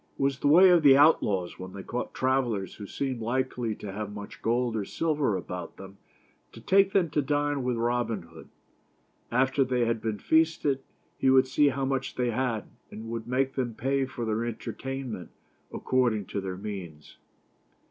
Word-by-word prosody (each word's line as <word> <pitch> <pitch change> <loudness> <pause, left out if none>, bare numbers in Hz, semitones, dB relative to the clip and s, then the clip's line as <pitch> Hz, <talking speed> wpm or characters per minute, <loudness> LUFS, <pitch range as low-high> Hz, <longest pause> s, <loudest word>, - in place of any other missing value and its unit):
It - - -6
was 135 -1 +1
the - - 0
way 180 +6 +8
of 175 -2 +5
the 140 -3 +7
outlaws 105 - +3
when 95 0 -8
they 100 - -7
caught 125 - -4
travelers 125 -8 0
who 100 - -9
seemed 130 -1 -3
likely 120 -1 -1
to 100 - -7
have 105 +1 -5
much 105 0 -9
gold 120 0 0
or 105 - -1
silver 145 -4 0
about 90 -1 -7
them 95 0 -11 0.6
to - - -11
take 195 0 +3
them 180 -6 +2
to 150 - +1
dine 145 0 0
with 125 -1 -1
Robin 115 -4 -1
Hood. 80 -1 -14 0.8
After 130 +3 +2
they 125 -2 0
had 115 -1 -1
been 110 -2 -2
feasted 160 -1 +2 0.4
he 130 - +3
would 130 0 +6
see 145 +3 +3
how 135 0 0
much 135 0 -2
they 125 -1 0
had, 115 -3 -1 0.3
and 115 +1 -8
would 115 -1 -5
make 130 +2 0
them 120 -4 -2
pay 135 +3 0
for 120 -2 -5
their 110 +1 -1
entertainment 120 -3 -5 0.4
according 120 -6 0
to 100 - -4
their 95 -1 -5
means. 90 -7 -8
125 Hz, 180 wpm, -28 LUFS, 105-135 Hz, 0.8 s, way